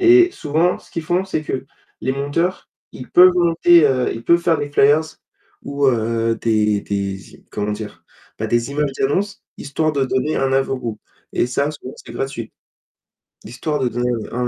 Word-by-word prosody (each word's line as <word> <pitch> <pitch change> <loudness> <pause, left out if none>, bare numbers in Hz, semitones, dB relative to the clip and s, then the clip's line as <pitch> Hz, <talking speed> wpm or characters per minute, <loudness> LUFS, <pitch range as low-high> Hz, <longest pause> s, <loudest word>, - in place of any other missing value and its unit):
Et 360 0 +6
souvent, 160 +4 0
ce - - -20
qu'ils 165 - -4
font, 180 +3 0
c'est 170 -5 -3
que, 135 -3 -4 0.4
les - - 0
monteurs, 145 +7 -2 0.2
ils 125 - -10
peuvent 180 +1 +7
monter, 170 -1 +5
heu, 130 -2 +1
ils 115 - -8
peuvent 170 0 +4
faire 170 -2 +2
des 145 - -3
flyers 145 +2 +4 0.6
ou 140 0 -1
heu, 115 -1 0
des 105 -2 +1
des 100 -1 -2
z - - -15
comment 105 0 -3
dire? 105 0 -7 0.4
Bah 110 - -1
des 120 +3 0
images 145 -1 0
d'annonce, 190 +9 -1 0.2
histoire 155 +2 -1
de 140 -2 +1
donner 130 +5 0
un 135 0 0
avant 135 0 +1
goût. 115 -4 -5 0.3
Et - - +1
ça, 140 +4 0
souvent, 140 -3 -9
c'est - - -12
gratuit. 135 -4 -5 0.9
Histoire 150 +5 -3
de 130 - +1
donner 120 +1 -1 0.2
un 125 +1 -1
135 Hz, 180 wpm, -20 LUFS, 120-160 Hz, 0.9 s, peuvent